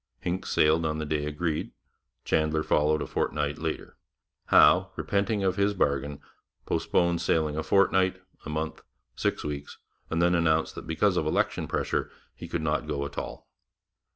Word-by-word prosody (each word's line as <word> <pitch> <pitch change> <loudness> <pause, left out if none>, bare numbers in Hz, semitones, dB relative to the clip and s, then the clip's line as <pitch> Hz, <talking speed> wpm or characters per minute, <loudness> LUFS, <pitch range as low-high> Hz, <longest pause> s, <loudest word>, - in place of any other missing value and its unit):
Hincks 90 +2 -3
sailed 80 +2 +3
on 80 -1 -1
the 75 - -3
day 75 -1 -1
agreed; 75 +1 -2 0.5
Chandler 80 0 +1
followed 75 0 +2
a - - -4
fortnight 75 +1 -1
later; 80 0 -4 0.5
Howe, - - +6
repenting 100 +1 0
of 95 0 +1
his 100 +1 +2
bargain, 70 -3 0 0.5
postponed 85 -1 +1
sailing 80 -2 +1
a 80 - -1
fortnight, 95 +2 +3 0.2
a - - -7
month, 80 +1 -3 0.3
six - - -1
weeks, 75 -1 -5 0.3
and 80 - -1
then 85 +1 +3
announced 80 -2 +2
that - - -9
because 90 +4 +2
of 75 - 0
election - - 0
pressure - - -1 0.2
he - - -9
could 85 - -3
not 75 0 0
go 70 -2 -2
at 70 0 -8
all. - - -8
80 Hz, 160 wpm, -27 LUFS, 75-90 Hz, 0.5 s, Howe